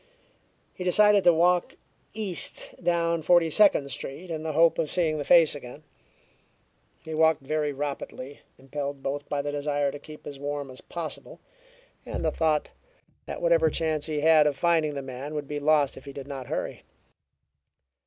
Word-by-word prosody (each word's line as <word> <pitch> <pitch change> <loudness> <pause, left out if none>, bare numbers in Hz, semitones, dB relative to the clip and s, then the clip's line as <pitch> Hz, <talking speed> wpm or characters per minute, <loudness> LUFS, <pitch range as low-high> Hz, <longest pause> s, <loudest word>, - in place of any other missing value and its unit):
He 180 - -7
decided 205 +2 +5
to 175 - +8
walk 175 +2 +2 0.4
east 220 - -1
down 170 -1 +1
Forty 165 0 +4
Second 200 -7 +4
Street, 165 +8 -7
in 160 -1 -3
the 160 0 -3
hope 165 +2 +4
of 160 -2 0
seeing 160 -4 0
the - - -2
face 165 0 +5
again. 145 +1 -10 1.2
He 160 - -6
walked 160 -2 +3
very 150 +1 -1
rapidly, 140 -1 -6 0.2
impelled 140 +1 -6
both 140 +1 -4
by 145 -1 -1
the 145 - -3
desire 145 -1 -1
to 145 - -8
keep 150 +1 -13
as 140 -2 -8
warm 145 -1 -4
as 130 - -10
possible, 170 -2 -7 0.6
and - - -4
the - - +2
thought 155 -2 0 0.6
that - - -6
whatever - - +4
chance 155 -2 -2
he 150 -2 -2
had 155 -1 +5
of 145 -2 -1
finding 160 -4 +1
the 140 - -4
man 135 +3 -7
would 145 -2 -4
be 150 0 -4
lost 145 -1 +2
if 135 - -13
he 140 - -9
did 135 -1 -8
not 135 -3 -7
hurry. - - -4
150 Hz, 175 wpm, -26 LUFS, 145-170 Hz, 1.2 s, to